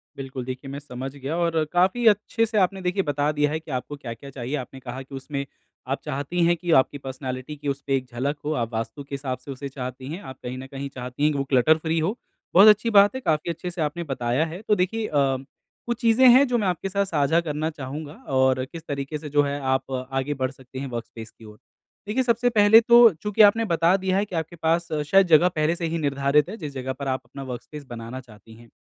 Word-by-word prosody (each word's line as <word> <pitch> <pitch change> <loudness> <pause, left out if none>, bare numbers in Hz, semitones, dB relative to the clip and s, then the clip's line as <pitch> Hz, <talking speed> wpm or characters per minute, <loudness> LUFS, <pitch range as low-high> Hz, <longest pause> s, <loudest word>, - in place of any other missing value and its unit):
बिल्कुल, 130 -2 -6
देखिए 130 +1 -6
मैं 140 - -5
समझ 135 -1 -7
गया 140 +4 -4
और 170 -2 +1
काफ़ी 190 +7 +2
अच्छे 220 +2 +3
से 220 -1 -3
आपने 190 0 +2
देखिए 180 +2 0
बता 145 0 0
दिया 150 0 +1
है 155 - -1
कि 160 -1 -11
आपको 130 +3 -4
क्या-क्या 135 0 -8
चाहिए। 130 +2 -4
आपने 130 0 -6
कहा 125 +1 -7
कि 135 +1 -10
उसमें 140 +1 -4 0.4
आप - - -1
चाहती 145 +6 -1
हैं 175 +1 +4
कि 175 0 -3
आपकी 145 - -1
पर्सनैलिटी 130 +1 -6
की 145 0 -7
उसपे 140 0 -1
एक 130 - -5
झलक 140 +5 -2
हो। 155 - 0
आप 115 -3 -2
वास्तु 115 +5 -4
के 140 0 -6
हिसाब 135 -2 -4
से 140 - -10
उसे 140 +1 -6
चाहती 130 -1 -7
हैं, 185 - -6
आप 130 -8 -10
कहीं 125 +1 -5
न 130 +1 -8
कहीं 140 0 -6
चाहती 125 +2 -5
है - - +5
कि 145 - -2
वो 140 - 0
क्लटर-फ्री 155 +5 +2
हो। 190 +10 -1 0.4
बहुत 195 +4 +8
अच्छी 215 +2 +5
बात 205 +2 +6
है 260 - -4
काफ़ी 155 -5 0
अच्छे 180 +2 -6
से 170 -2 -5
आपने 160 +3 -2
बताया 130 0 -1
है। 165 +4 -7
तो 210 - +4
देखिए 215 +4 -1
अ, 135 -3 +1 0.5
कुछ 240 -1 -2
चीज़ें 235 +3 +5
हैं 260 +3 +7
जो 245 -1 +1
मैं 205 -4 0
आपके 180 +2 -2
साथ 200 +1 0
साझा 160 -2 +2
करना 155 -1 -2
चाहूँगा 145 0 -7 0.2
और 130 0 +3
किस 165 +3 -11
तरीके 140 +2 -3
से 150 0 -8
जो 145 +1 +3
है 140 0 -2
आप 130 0 -1 0.2
आगे 135 +2 -1
बढ़ 130 -1 -2
सकते 130 0 -11
हैं 140 - -4
वर्कस्पेस 115 -1 -7
की 115 - -17
ओर। 105 0 -13 0.5
देखिए 230 +5 +1
सबसे 240 0 +2
पहले 220 -1 +7
तो 235 0 +8
चूँकि 210 +6 0
आपने 225 +2 +6
बता 170 0 +3
दिया 190 0 0
है 205 - +1
कि 190 - -8
आपके 165 +1 -3
पास 165 +1 0 0.2
शायद 195 +2 +5
जगह 165 +2 +6
पहले 155 +2 +1
से 170 - -4
ही 165 +1 -2
निर्धारित 140 0 +1
है 215 - -6
जिस 150 -7 -7
जगह 130 0 -4
पर 140 0 -6
आप 130 0 -1
अपना 135 +3 -9
वर्कस्पेस 130 +4 -8
बनाना 120 0 -7
चाहती 110 -2 -17
है। 115 +1 -16
145 Hz, 240 wpm, -24 LUFS, 130-175 Hz, 0.5 s, बहुत